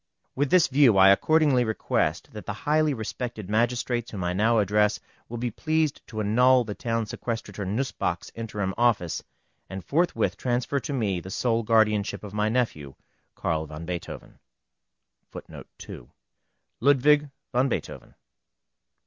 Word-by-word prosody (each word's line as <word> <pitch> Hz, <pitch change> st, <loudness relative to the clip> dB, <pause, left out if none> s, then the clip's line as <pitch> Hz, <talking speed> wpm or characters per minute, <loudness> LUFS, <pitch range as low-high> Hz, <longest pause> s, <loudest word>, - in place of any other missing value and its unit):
With 145 Hz, +1 st, 0 dB
this 185 Hz, -3 st, +5 dB
view 130 Hz, -6 st, +4 dB
I 95 Hz, 0 st, +8 dB
accordingly 145 Hz, +4 st, +4 dB
request 100 Hz, -, -1 dB
that 105 Hz, -, -9 dB
the 105 Hz, -, -2 dB
highly 155 Hz, 0 st, +3 dB
respected 110 Hz, -4 st, -5 dB
magistrates 120 Hz, +1 st, 0 dB
whom 95 Hz, -4 st, -5 dB
I 90 Hz, 0 st, -1 dB
now 110 Hz, +5 st, +2 dB
address 105 Hz, 0 st, +2 dB, 0.3 s
will 120 Hz, -, -5 dB
be 120 Hz, 0 st, -2 dB
pleased 155 Hz, +3 st, -1 dB
to 110 Hz, -, -6 dB
annul 125 Hz, +4 st, +4 dB
the 105 Hz, -2 st, -5 dB
Town 115 Hz, +1 st, -2 dB
Sequestrator 110 Hz, -3 st, -5 dB
Nussböck's 105 Hz, -5 st, -2 dB
interim 105 Hz, -4 st, -4 dB
office, 110 Hz, -9 st, +1 dB, 0.5 s
and 95 Hz, -1 st, -7 dB
forthwith 170 Hz, +5 st, 0 dB
transfer 125 Hz, +3 st, -1 dB
to 145 Hz, -, -6 dB
me 105 Hz, -9 st, -1 dB
the 95 Hz, -, -9 dB
sole 115 Hz, +3 st, 0 dB
guardianship 110 Hz, -3 st, +1 dB
of 105 Hz, -1 st, -9 dB
my 105 Hz, 0 st, 0 dB
nephew 110 Hz, -, -2 dB, 0.4 s
Carl 80 Hz, -1 st, -2 dB
van 75 Hz, +2 st, -8 dB
Beethoven. 90 Hz, 0 st, -7 dB, 2.4 s
LUDWIG 145 Hz, +2 st, +4 dB, 0.2 s
VAN 130 Hz, +2 st, +2 dB
BEETHOVEN. -, -, -5 dB
115 Hz, 135 wpm, -26 LUFS, 100-130 Hz, 2.4 s, I